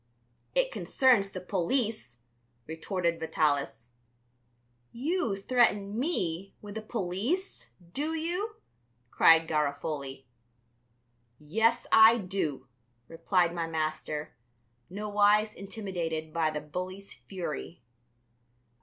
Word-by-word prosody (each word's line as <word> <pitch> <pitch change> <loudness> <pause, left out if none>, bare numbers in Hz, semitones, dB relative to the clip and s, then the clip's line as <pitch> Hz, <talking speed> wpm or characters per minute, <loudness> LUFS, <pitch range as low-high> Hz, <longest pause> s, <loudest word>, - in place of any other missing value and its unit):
"It - - +2
concerns 245 - +3
the 190 - -6
police," 185 - -1 0.4
retorted 170 +1 -2
Vitalis. 145 -7 0 1.0
"You 245 - -1
threaten 210 -2 +2
me 195 - -1
with 205 -1 -9
the 220 - -4
police, 215 - -3 0.2
do 310 +3 -1
you?" 355 +7 -2 0.6
cried 165 0 +6
Garofoli. 140 -3 -2 1.1
"Yes, 225 - +1
I 225 +1 +8
do," 180 - -3 0.4
replied 170 +1 +1
my 170 -1 -2
master, 155 -1 -3 0.5
nowise 210 +1 +2
intimidated 175 -6 -4
by 165 -2 +2
the 150 -1 -4
bully's 185 +6 -6
fury. 160 +3 -6
185 Hz, 90 wpm, -29 LUFS, 160-220 Hz, 1.1 s, I